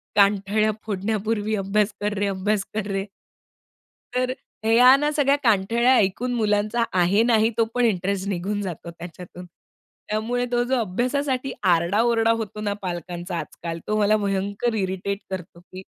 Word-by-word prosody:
कानठळ्या 205 +1 +3
फोडण्यापूर्वी 215 +1 -1
"अभ्यास 205 +1 0
कर 210 0 0
रे, 205 - +1
अभ्यास 200 +1 0
कर 215 -2 -2
रे." 195 0 -1 1.1
तर 255 0 0 0.3
ह्या 250 +4 +7
ना 295 +1 0
सगळ्या 285 -2 +3
कानठळ्या 230 +4 +3
ऐकून 230 +5 +1
मुलांचा 215 +1 +1 0.2
आहे 195 +6 +4
नाही 225 -2 +3
तो 225 - +4
पण 245 -1 +3
इंटरेस्ट 195 -1 0
निघून 200 +3 -2
जातो 175 -3 -6
त्याच्यातून. 175 +1 -10 0.6
त्यामुळे 235 +4 -1
तो 240 0 +2
जो 260 +2 0
अभ्यासासाठी 255 +6 -1
आरडा-ओरडा 220 +7 +3
होतो 215 -2 -3
ना 205 -1 -1
पालकांचा 175 0 -5
आजकाल 165 0 -6
तो 215 - 0
मला 210 +1 +4
भयंकर 200 +3 -1
इरिटेट 195 0 -2
करतो 180 -2 -7
की 185 +1 -11
210 Hz, 145 wpm, -23 LUFS, 190-230 Hz, 1.1 s, ह्या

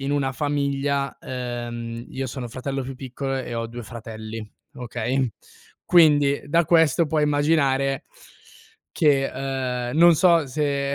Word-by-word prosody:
in 135 +1 -2
una 135 -2 0
famiglia 140 -1 -1
ehm, 120 -2 -5
io 135 0 -4
sono 125 0 -5
fratello 135 +2 -4
più 135 +1 -6
piccolo 135 +1 -4
e 125 -2 -4
ho 115 0 -2
2 120 +1 -8
fratelli, 110 -1 -8 0.3
okay? 125 +1 -2 0.5
Quindi, 145 -5 +4
da 165 +3 +3
questo 165 -1 +4
puoi 150 0 +1
immaginare 145 -2 +1 0.9
che, 140 -5 +2 0.6
ehm, 145 - -4
non 170 0 +7
so 170 -2 +4
se 140 0 -1
135 Hz, 130 wpm, -23 LUFS, 125-145 Hz, 0.9 s, non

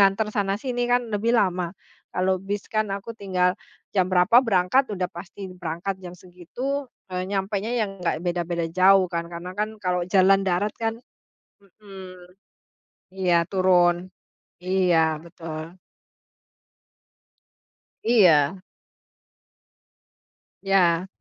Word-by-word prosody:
nganter 200 +2 +3
sana-sini, 240 +5 -1
kan 245 0 +2
lebih 230 +4 +1
lama. 180 -3 0 0.3
Kalau 185 0 0
bis 200 +1 -4
kan 215 -1 +1
aku 195 +3 -5
tinggal, 185 -4 0 0.4
jam 185 -2 +2
berapa 185 +6 +5
berangkat, 230 +3 +2
udah 185 -3 -2
pasti 185 +2 -9
berangkat 180 +2 -5
jam 180 -1 -9
segitu. 240 - -5 0.2
Eee, 180 0 -3
nyampenya 200 +4 -2
yang 195 -4 -2
enggak 170 0 -2
beda-beda 175 -1 -1
jauh, 190 +1 +5
kan. 170 -1 -4
Karena 175 +2 -7
kan, 215 +2 -3
kalau 180 -3 -1
jalan 195 0 +5
darat 185 +4 0
kan 225 0 -1 0.6
mhm. 190 -3 -13 0.9
Iya 175 -3 +2
turun. 180 -1 +2 0.5
Iya 175 -4 +2
betul. 165 0 -8 2.3
Iya. 185 -7 +4 2.0
Ya. 185 -2 +2
185 Hz, 110 wpm, -24 LUFS, 175-205 Hz, 2.3 s, berapa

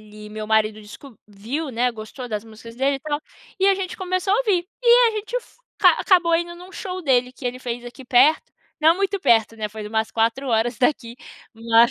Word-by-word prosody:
ele 210 0 -12
meu 215 0 -6
marido 215 0 +1
desco 220 +4 -13
viu, 245 +10 -5
né, 245 +1 +1
gostou 230 +3 -8
das 210 -1 -4
músicas 225 +1 -12
dele, 270 +3 +1
e - - -13
tal, 295 +1 -3 0.4
e 385 - +4
a 395 - +5
gente 385 +3 -5
começou 370 -1 -1
a - - +4
ouvir. 395 -8 +1 0.2
E 480 0 +6
a - - -1
gente 430 +3 -4
f - - -8 0.2
ca - - +7
acabou 350 -3 +3
indo 345 +1 -1
num 360 +2 -13
show 370 -1 -5
dele, 250 -4 +2
que 255 0 -7
ele 245 +1 -3
fez 245 -1 -5
aqui 245 +2 -10
perto. 255 +5 +3 0.3
Não 320 +2 +5
muito 395 0 -1
perto, 225 - +3
né, 215 -1 -3
foi 215 0 -8
umas 220 +1 -1
4 230 +4 0
horas 230 0 +1
daqui, 245 -3 0 0.4
mas 230 +1 +4
250 Hz, 215 wpm, -22 LUFS, 225-350 Hz, 0.4 s, ca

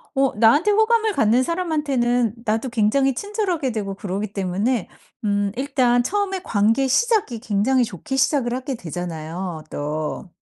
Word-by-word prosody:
어 270 0 +2
나한테 285 - +5
호감을 440 +1 +3
갖는 230 - +3
사람한테는 270 - 0
나도 225 +4 0
굉장히 240 +5 +2
친절하게 375 - -2
되고 200 -3 -3
그러기 200 +1 -4
때문에 195 +4 -1 0.4
음 205 -1 +1
일단 255 -3 +2
처음에 390 +4 -1
관계 225 +6 +2
시작이 400 - +1
굉장히 225 +5 +1
좋게 220 - -5
시작을 265 -2 +1
하게 260 +1 -3
되잖아요, 170 -2 -5
또. 155 +4 -4
240 Hz, 325 characters per minute, -22 LUFS, 200-285 Hz, 0.4 s, 나한테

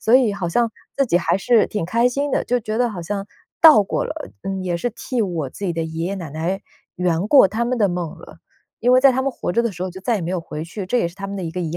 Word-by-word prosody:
所 225 - +3
以 250 -5 +5
好 185 -4 -3
像 235 +6 +1 0.3
自 275 - +3
己 175 -7 +2
还 175 - +1
是 225 +2 +3
挺 210 - -3
开 230 +8 +2
心 280 +3 -2
的， - - 0
就 245 - +2
觉 215 0 -3
得 245 0 +2
好 190 -6 -6
像 200 +3 -4 0.3
到 310 -10 +9
过 195 - -2
了， 310 +1 -6
嗯， 195 -1 -3
也 175 -2 -1
是 245 - -1
替 240 +2 -4
我 170 -9 -2
自 200 - -6
己 175 - -1
的 165 - -1
爷 160 +1 -4
爷 195 - -2
奶 170 -7 -6
奶 170 +6 -3 0.3
圆 180 +2 0
过 275 -5 +7
他 220 +5 -2
们 250 +1 0
的 205 -5 +2
梦 175 -3 -4
了。 - - -14 0.4
因 245 - +3
为 255 - +6
在 275 -2 +7
他 260 - 0
们 275 +1 0
活 175 - -4
着 235 - +2
的 235 - 0
时 180 -2 -7
候， 185 - -3
就 185 +1 -10
再 230 +5 0
也 200 - -2
没 170 - -3
有 185 - -1
回 155 -1 -6
去， 185 +3 -6
这 245 - 0
也 170 - +1
是 170 - -15
他 195 +1 -6
们 200 0 -5
的 190 - -4
一 165 - -3
个 180 +3 -4
遗 170 -1 -3
195 Hz, 330 characters per minute, -21 LUFS, 175-235 Hz, 0.4 s, 到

